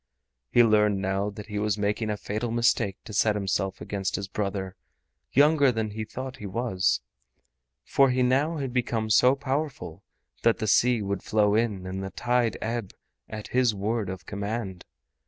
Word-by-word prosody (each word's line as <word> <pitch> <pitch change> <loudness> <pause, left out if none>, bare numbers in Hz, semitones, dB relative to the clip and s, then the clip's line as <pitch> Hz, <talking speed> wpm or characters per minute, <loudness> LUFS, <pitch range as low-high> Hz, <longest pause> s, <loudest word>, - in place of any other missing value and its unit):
He 120 - +6
learned 105 -3 +3
now 95 +1 -1
that 105 0 -9
he 105 -1 -4
was 105 0 0
making 105 +2 -1
a 105 - -1
fatal 110 +4 -3
mistake 115 -4 +1
to 110 - -10
set 105 +1 +3
himself 95 -2 -1
against 95 -2 -2
his 100 +1 -4
brother, 95 -1 -3 0.6
younger 145 -1 +5
than 110 -2 -2
he 110 +1 -4
thought 130 +3 -7
he 105 - -7
was, 95 - 0 0.8
for 135 -1 +4
he 125 0 +2
now 140 +6 +2
had 135 -4 -3
become 115 -3 -1
so 125 +4 +6
powerful 140 - -3 0.4
that 115 -1 +3
the - - -2
sea 115 +1 +3
would 100 -1 -2
flow 105 -1 +2
in 105 -4 0
and 95 +1 -4
the 95 - -4
tide 120 0 0
ebb 115 -3 -3 0.4
at 110 -1 -7
his 125 -4 +2
word 105 0 -1
of 95 -1 -7
command. 100 -2 -4
110 Hz, 175 wpm, -26 LUFS, 100-120 Hz, 0.8 s, He